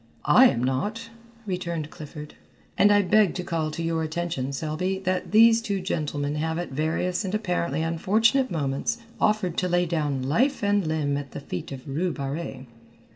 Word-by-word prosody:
"I 260 - +7
am 120 - 0
not," 210 - -2 0.3
returned 170 -5 -3
Clifford, 150 0 -9 0.4
"and 205 - +5
I 205 0 +5
beg 210 -1 +3
to 180 - -3
call 165 -3 -1
to 165 +2 -5
your 165 -1 0
attention, 160 -4 -2
Selby, 160 +7 -2
that 185 0 -1
these 225 +1 +6
two 200 -4 -2
gentlemen 150 -5 -2
have 160 +1 -1
at 175 -3 -4
various 170 +6 -1
and 190 +1 -2
apparently 175 -7 -1
unfortunate 220 +10 +2
moments, 150 +6 -1 0.2
offered 210 -5 +1
to 180 - 0
lay 175 0 +2
down 150 -6 -1
life 235 - +1
and 205 -3 +2
limb 150 -3 0
at 140 -2 -7
the - - -5
feet 115 -7 -6
of 135 0 -8
Rue 165 +6 -1
Barrée. 140 -2 -5
170 Hz, 175 wpm, -25 LUFS, 150-195 Hz, 0.4 s, I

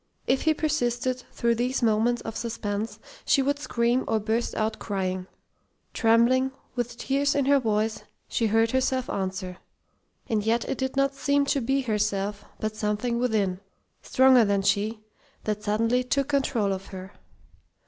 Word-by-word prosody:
If 260 - +2
he 315 -1 +2
persisted, 255 -5 -1
through 235 0 +1
these 245 +2 -1
moments 230 +2 +2
of 225 - -6
suspense, 215 -2 -3 0.3
she 275 - +3
would 285 +1 0
scream 240 -2 +1
or 220 -1 +1
burst 220 +3 -1
out 215 0 -1
crying. 185 -2 -3 0.7
Trembling, 245 +3 +3 0.2
with 240 -1 -3
tears 280 +3 +1
in 280 -2 +2
her 280 0 +5
voice, 215 -2 0 0.3
she 230 - 0
heard 225 +1 +2
herself 260 -1 0
answer. 185 -1 -4 0.7
And 215 -2 0
yet 230 +2 +1
it - - -3
did 265 0 -2
not 275 0 +2
seem 280 +1 +1
to 280 0 +1
be 270 +3 +1
herself, 205 -3 -1 0.2
but 215 0 -3
something 215 +3 -1
within, 210 -7 0 0.4
stronger 260 -2 +5
than 200 -2 +1
she, 215 +3 0 0.4
that 210 -1 -2
suddenly 225 +4 +1
took 275 +2 0
control 255 -8 +1
of 190 0 -6
her. 190 0 -9
230 Hz, 155 wpm, -26 LUFS, 210-260 Hz, 0.7 s, her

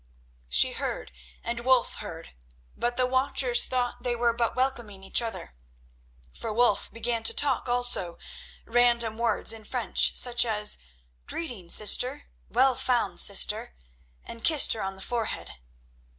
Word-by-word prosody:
She 60 - +5
heard - - -7 0.3
and 235 0 -5
Wulf 250 0 0
heard, 165 -6 -11 0.4
but 240 0 -4
the 255 - +1
watchers 255 -1 +2
thought 250 -1 -4
that - - -24
they 245 -1 -3
were 235 0 -1
but 235 0 -3
welcoming 240 -7 -4
each 195 - +2
other, 225 - -8 0.8
for 225 - -7
Wulf 230 -1 0
began 230 0 -2
to 225 - +1
talk 270 -3 0
also, 245 -8 0 0.5
random 235 -2 0
words 235 -1 0
in 225 -1 -11
French, 245 +2 0
such 245 -1 +4
as 210 -3 +2 0.5
"Greeting, 235 - -7
sister!" 250 +9 +3 0.2
"Well 260 +3 +2
found, 245 0 -2
sister!" 65 - +2 0.5
and 230 - -10
kissed 310 -4 +5
her 220 - -6
on 195 0 -6
the 190 - -10
forehead. 235 -2 -5
235 Hz, 145 wpm, -25 LUFS, 220-250 Hz, 0.8 s, She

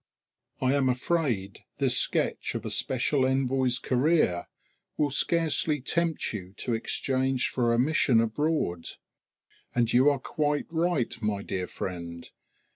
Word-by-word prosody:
I 130 +1 +2
am 140 -2 +2
afraid 125 - -1 0.2
this - - +4
sketch - - +1
of - - -4
a - - -3
special 130 +2 +1
envoy's 130 -1 +1
career 125 - +1 0.5
will 145 -2 +1
scarcely 160 0 +1
tempt 165 +3 -1
you 95 -3 -7
to 120 - -2
exchange 130 +3 -1
for 120 -2 0
a 115 - +2
mission 130 -2 +3
abroad! 115 - -1 0.9
And 120 -1 +1
you 130 +4 +6
are 145 - +1
quite 145 +2 -1
right, 165 -6 0
my 105 -2 -1
dear 90 -2 -3
friend. 85 -2 -6
130 Hz, 130 wpm, -27 LUFS, 115-150 Hz, 0.9 s, you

